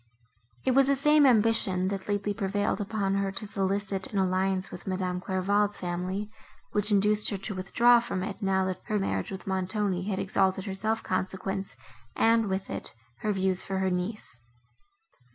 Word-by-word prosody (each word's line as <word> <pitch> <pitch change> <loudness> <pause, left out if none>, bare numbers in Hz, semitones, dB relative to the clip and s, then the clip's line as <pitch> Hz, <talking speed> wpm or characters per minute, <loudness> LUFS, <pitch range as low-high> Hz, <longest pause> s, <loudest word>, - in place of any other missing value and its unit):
It - - +3
was 270 +1 +5
the 280 - +3
same 300 +1 +5
ambition, 210 -6 +3
that 195 -1 -4
lately 205 0 -1
prevailed 205 0 -1
upon 200 -1 -1
her 195 -1 0
to 210 - -3
solicit 195 -1 -1
an 205 - -4
alliance 190 0 +1
with - - -9
Madame 185 -1 -2
Clairval's 200 +2 +1
family, 185 +4 -3 0.4
which 210 +1 +1
induced 210 +1 +3
her 200 - -2
to 195 +2 -5
withdraw 235 +6 +4
from 195 -5 -3
it, 195 0 -5
now 190 -1 +1
that 185 -1 -3
her 215 - 0
marriage 195 - -1
with 190 -1 -7
Montoni 190 0 -1
had 190 - -1
exalted 190 0 +1
her 195 - -3
self 220 +3 -1
consequence, 190 +1 -3 0.4
and, 225 -1 +3
with 190 +1 -2
it, - - -6 0.2
her 215 - 0
views 190 -2 +1
for 195 - -3
her 190 0 +1
niece. 180 - -3
195 Hz, 170 wpm, -28 LUFS, 190-210 Hz, 0.4 s, was